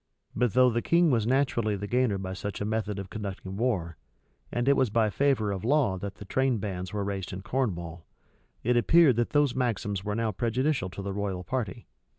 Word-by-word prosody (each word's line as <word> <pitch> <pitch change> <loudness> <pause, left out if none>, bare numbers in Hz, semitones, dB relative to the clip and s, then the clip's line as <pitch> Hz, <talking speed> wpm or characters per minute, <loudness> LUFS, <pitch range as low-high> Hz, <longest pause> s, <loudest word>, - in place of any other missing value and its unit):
But 120 -2 +1
though 125 0 +5
the 120 +1 0
king 170 +2 +3
was 115 -3 +1
naturally 120 -5 +1
the 100 +1 -5
gainer 120 -2 +1
by 95 -1 -5
such 100 +1 -5
a 100 - -2
method 105 -1 -2
of 95 -1 -7
conducting 95 -3 -6
war, 95 - -1 0.5
and 120 +1 -1
it 140 - +6
was 130 -4 +2
by 110 0 +2
favor 135 -7 +1
of 95 -2 -4
law 125 -7 +2
that 100 +1 -5
the 100 - -10
train, 130 +3 +1
bands 95 -3 -4
were 105 -1 -2
raised 100 -2 -4
in 95 +1 -6
Cornwall, 85 -11 -3 0.6
it 125 +2 +2
appeared 145 +2 +5
that 120 - +1
those 145 -3 +2
maxims 105 -6 -1
were 105 0 -2
now 115 -1 0
prejudicial 120 +2 0
to 100 +2 -7
the 100 0 -3
royal 95 -2 -3
party. 115 +1 -3
110 Hz, 205 wpm, -28 LUFS, 100-125 Hz, 0.6 s, it